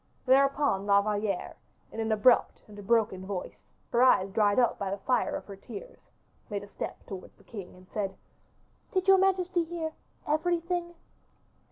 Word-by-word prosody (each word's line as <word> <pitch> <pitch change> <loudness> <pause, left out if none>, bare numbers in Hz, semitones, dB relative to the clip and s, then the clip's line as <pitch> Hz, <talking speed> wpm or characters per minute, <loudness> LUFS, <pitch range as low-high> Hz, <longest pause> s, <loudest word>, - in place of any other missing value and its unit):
Thereupon 275 -6 +3
La 200 0 +6
Valliere, 205 -2 -2 0.3
in - - -7
an 225 0 -1
abrupt 220 +3 +3
and 205 -1 -12
a - - -6
broken 205 -3 +1
voice, 190 -1 -6 0.2
her 240 - +3
eyes 195 -7 +5
dried 205 -1 +2
up 245 -3 +3
by 195 - -2
the 200 - -2
fire 250 +6 0
of - - -6
her 200 - -9
tears, 245 - -11 0.4
made 205 -2 -3
a - - -10
step - - -7
towards 190 -2 -9
the - - -22
king, 200 -6 -9
and 185 0 -17
said, 195 -2 -3 0.8
"Did 375 0 0
your 385 0 +7
majesty 370 -2 +2
hear 325 -1 -4 0.3
everything?" 345 +2 0
225 Hz, 170 wpm, -29 LUFS, 200-320 Hz, 0.8 s, your